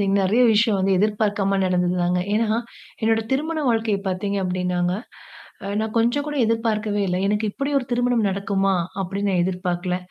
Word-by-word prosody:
பார்த்தீங்கன்னா, 195 0 +2
நெறைய 220 +7 +3
விஷயம் 215 -1 +3
வந்து 190 0 +2
எதிர்பார்க்காம 205 -1 +1
நடந்தது 180 -1 +1
தாங்க. 180 +1 +1
ஏன்னா, 220 0 +1 0.4
என்னோட 225 0 +3
திருமண 315 +4 -1
வாழ்க்கைய 225 -3 +1
பார்த்தீங்க 200 +2 -2
அப்டின்னாங்க 180 -1 -1 0.7
அ - - -4
நான் 220 0 -3
கொஞ்சம் 240 +5 +1
கூட 295 0 -4
எதிர்பார்க்கவே 220 -2 0
இல்ல. 180 - 0
எனக்கு 210 +1 0
இப்டி 275 +4 -3
ஒரு 260 - -5
திருமணம் 245 -2 +2
நடக்குமா? 195 0 0 0.3
அப்டின்னு 200 +2 -2
நான் 180 -2 +2
எதிர்பார்க்கல. 180 -1 -2
205 Hz, 160 wpm, -22 LUFS, 185-225 Hz, 0.7 s, நெறைய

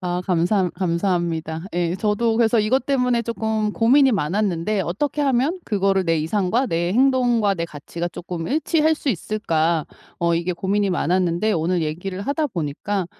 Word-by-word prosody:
아 180 -1 -2
감사 180 +1 +1
감사합니다. 170 -2 -1
예 175 +1 -1
저도 220 +3 +1
그래서 230 -1 +3
이것 250 +5 +1
때문에 250 -4 +1
쪼끔 220 -2 -2
고민이 265 +4 +4
많았는데 195 +2 0
'어떻게 290 - -2
하면 275 +6 +1
그거를 195 -2 +1
내 165 -1 +1
이상과 200 - 0
내 170 -1 -1
행동과 245 -5 +3
내 170 - -3
가치가 170 +2 -6
쪼끔 175 -1 -6
일치할 315 +1 +2
수 300 - -5
있을까.' 170 - 0 0.3
어 170 0 +1
이게 175 +2 -1
고민이 195 +2 0
많았는데 180 +3 +1
오늘 170 +2 0
얘기를 180 +5 -4
하다 290 +6 -1
보니까 180 - -3
195 Hz, 350 characters per minute, -22 LUFS, 170-235 Hz, 0.3 s, 고민이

